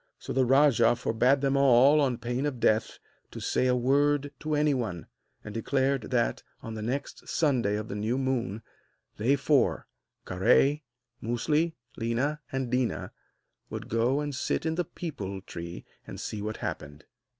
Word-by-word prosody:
So - - -6
the 130 0 +3
rajah 125 -3 +5
forbade 125 +3 +2
them 135 -1 +1
all, 140 +2 +6
on 130 -4 +1
pain 125 +4 -2
of 130 -4 -4
death, 110 -1 +1 0.3
to - - -8
say 130 - +1
a 125 - +3
word 145 +3 +2
to 155 0 -1
anyone; 125 - 0 0.4
and 105 - -8
declared 135 +2 0
that, - - 0 0.2
on 115 - -6
the 110 - -5
next 125 +6 -4
Sunday 125 - +1
of 105 +1 -4
the - - -5
new 110 +5 -1
moon, 125 -5 -2 0.5
they 125 +7 +3
four 140 -2 +2 0.4
Kahré, 125 +10 +3 0.4
Musli, 150 +8 0 0.2
Léna 125 +6 -1
and 130 -2 -3
Déna 125 -1 -1 0.6
would - - -6
go 120 +5 +1
and 145 -1 -3
sit 130 - -2
in 160 - +1
the 175 +1 -1
peepul 100 - -6
tree 85 0 -7 0.2
and - - -8
see 105 - -5
what 110 +1 -4
happened. 75 0 -6
125 Hz, 160 wpm, -28 LUFS, 115-140 Hz, 0.6 s, all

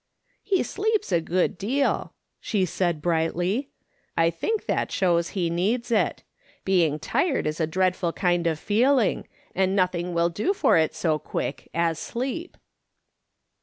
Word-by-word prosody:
" - - -41
He 390 -3 +1
sleeps 430 - -1
a 170 -2 +3
good 175 +1 0
deal," 265 +7 0 0.2
she 195 -4 0
said 170 -4 -1
brightly; 175 - 0 0.2
" - - -41
I 165 0 +4
think 430 - -2
that - - -1
shows 170 -2 +1
he 170 -3 0
needs 220 +8 0
it. 225 - +1 0.4
Being 170 -6 +2
tired 290 - 0
is 155 +2 -2
a 160 - +1
dread 185 +2 +1
ful 175 -3 -1
kind 175 -1 +1
of 160 -2 0
feeling, 230 - +2 0.3
and 190 +1 +1
nothing 180 -2 0
will 170 0 +3
do 215 - -1
for - - +3
it 160 -1 +2
so 155 -3 0
quick - - -4
as 165 -1 0
sleep." 270 +9 -4
180 Hz, 160 wpm, -25 LUFS, 170-235 Hz, 0.4 s, I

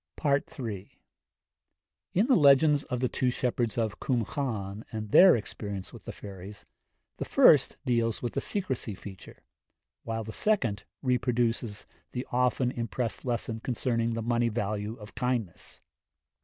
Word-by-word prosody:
III. 105 -7 -6 1.1
In 200 +5 +3
the 260 0 +4
legends 145 - +5
of 125 -2 -3
the 130 - +2
two 125 +1 0
shepherds 120 -2 -1
of 110 -2 -1
Cwm 120 -5 -1
Llan 110 -7 -3
and 110 -1 -5
their 185 0 +8
experience 100 -3 -5
with - - -12
the - - -5
fairies, 100 +1 -10 0.5
the - - -3
first - - +5
deals 115 -2 +1
with 120 - -3
the - - -1
secrecy 130 - -2
feature, 95 -1 -12 0.6
while 115 0 -3
the 110 +1 -7
second 125 - +1 0.2
reproduces 120 -3 0 0.3
the 125 +1 -3
often 125 0 +2
impressed 120 0 -3
lesson 115 -2 -2
concerning 115 -1 -1
the 115 - -3
money 120 0 +1
value 105 -1 -2
of 105 -3 -12
kindness. 120 -8 -3
115 Hz, 140 wpm, -29 LUFS, 105-125 Hz, 1.1 s, their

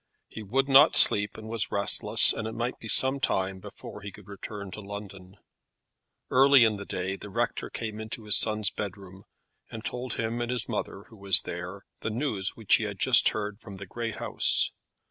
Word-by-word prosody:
He 110 - -10
would 130 +7 -1
not 140 +3 +6
sleep, 105 0 +6
and 110 0 -10
was 115 -1 0
restless, 100 0 +3
and 110 - -5
it 110 - -7
might 120 +2 -4
be 110 - -10
some 130 +4 +2
time 95 -5 -2
before 100 +1 -11
he 100 - -8
could 105 -1 -16
return 100 0 -9
to 105 - -9
London. 100 -2 -10 1.0
Early 135 0 +6
in 110 -2 +1
the 100 - -9
day 95 +2 -4
the 105 - -11
rector 120 +4 -3
came 110 -2 -6
into 110 +1 -7
his 105 -1 +4
son's 110 -1 +2
bedroom, 95 -1 -8 0.4
and 110 0 -9
told 125 -1 -5
him 115 +1 -3
and 120 - -3
his 125 -3 0
mother, 100 - -5
who 110 - -16
was 100 -1 +4
there, 90 +3 -8 0.2
the - - -3
news 110 -5 -2
which 110 -4 +2
he - - -4
had - - -6
just - - +4
heard 105 -1 -5
from 100 -4 -11
the 100 +1 -9
great 115 +3 -6
house. - - +1
105 Hz, 200 wpm, -27 LUFS, 100-115 Hz, 1.0 s, not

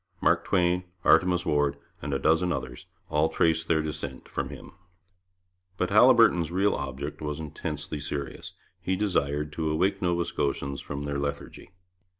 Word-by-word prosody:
Mark - - +2
Twain, 90 -1 +2 0.2
Artemus 90 -1 +4
Ward, 75 -1 +1 0.2
and 70 - -4
a 70 - +1
dozen 80 +5 +2
others, 65 -6 -5 0.2
all 75 +2 +2
trace 80 -1 +2
their 80 -1 +1
descent 70 -4 -6
from - - -3
him. - - -10 1.1
But 90 - -1
Haliburton's 110 -7 +6
real 95 +3 +2
object 70 +1 -5
was 75 -1 -3
intensely 75 -1 -5
serious. 70 0 -5 0.3
He 95 +1 0
desired 75 -7 0
to 80 0 -1
awake 95 +6 +1
Nova 85 -2 +1
Scotians 70 -4 -2
from 70 0 -5
their 70 0 -2
lethargy. 70 0 -5
80 Hz, 150 wpm, -27 LUFS, 70-90 Hz, 1.1 s, Haliburton's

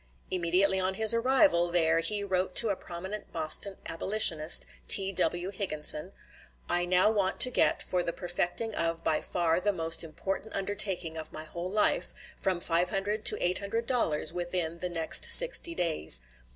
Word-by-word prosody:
Immediately 185 +2 0
on 190 0 -2
his 220 +2 +5
arrival 250 - +1
there 165 -1 +1
he 205 +4 -1
wrote 185 -2 -3
to 230 - +4
a 200 - -2
prominent 190 +4 -9
Boston 165 +4 -1
abolitionist, 165 -3 +3 0.2
T.W. 190 -2 +3
Higginson: 165 -3 0 0.6
"I 175 0 0
now 185 +4 +2
want 200 -3 -3
to 255 - +7
get, - - +1
for 180 - -3
the 170 - -4
perfecting 175 +5 -5
of 165 -2 -3
by 155 - -1
far 170 -1 -2
the 205 +3 -1
most 165 -3 +2
important 190 +6 -7
undertaking 195 -4 0
of 160 - -8
my 155 - -8
whole 170 +3 -8
life, 210 +2 -1 0.2
from 185 -2 -3
$500 195 +5 -2
to - - +4
$800 200 -3 -2
within 175 -1 -4
the 180 - -5
next 165 -2 +5
sixty 485 -9 +5
days. 80 - +1
180 Hz, 150 wpm, -27 LUFS, 165-200 Hz, 0.6 s, to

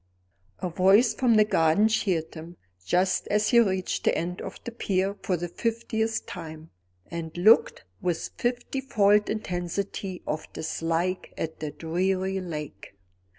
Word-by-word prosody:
A - - +1
voice 195 +7 +4
from 235 0 +3
the 215 0 +6
garden 165 +2 +3
cheered 185 -7 0
him, 165 +1 -10 0.3
just 180 - +1
as 210 0 +2
he 240 - +6
reached 190 -5 0
the - - +2
end 180 +2 -3
of - - -7
the 240 - -5
pier 195 -3 -1
for 185 - 0
the 175 +1 -4
fiftieth 225 +2 -2
time, 160 -2 -9 0.4
and 165 -1 -6
looked 215 +6 +5 0.2
with 175 -2 -2
fifty 245 +2 -2
fold 210 -5 +3
intensity 185 -1 -3
of 155 +1 -4
dislike 165 +3 -2
at 160 0 -4
the 155 - -3
dreary 185 +5 -1
lake. 150 - -7
185 Hz, 145 wpm, -26 LUFS, 165-210 Hz, 0.4 s, the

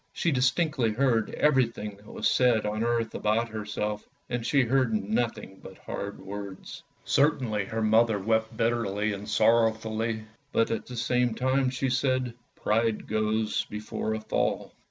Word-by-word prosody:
She 170 - 0
distinctly 130 -1 +2
heard 115 -3 +2
everything 115 -7 +1
that 105 +1 -19
was - - 0
said 120 -4 +3
on 105 +1 -1
earth 115 -1 0
about 110 +2 0
herself, 105 -1 -4 0.2
and 120 -1 -1
she 135 +3 +3
heard 130 0 +2
nothing 105 -1 -2
but 95 - -11
hard 100 0 -6
words. 100 0 -8 0.2
Certainly 125 -8 +2
her 110 +2 -3
mother 110 0 +4
wept 110 +2 0
bitterly 110 -3 0
and 100 +2 -7
sorrowfully, 110 0 +2 0.3
but 115 - +2
at 115 - -3
the 125 - -7
same 125 0 +1
time 130 +1 +1
she 130 0 -1
said, 130 -1 +1
" - - -43
Pride 110 0 +1
goes 110 0 0
before 105 +1 -4
a - - -3
fall! 110 - -1
115 Hz, 155 wpm, -27 LUFS, 105-125 Hz, 0.3 s, mother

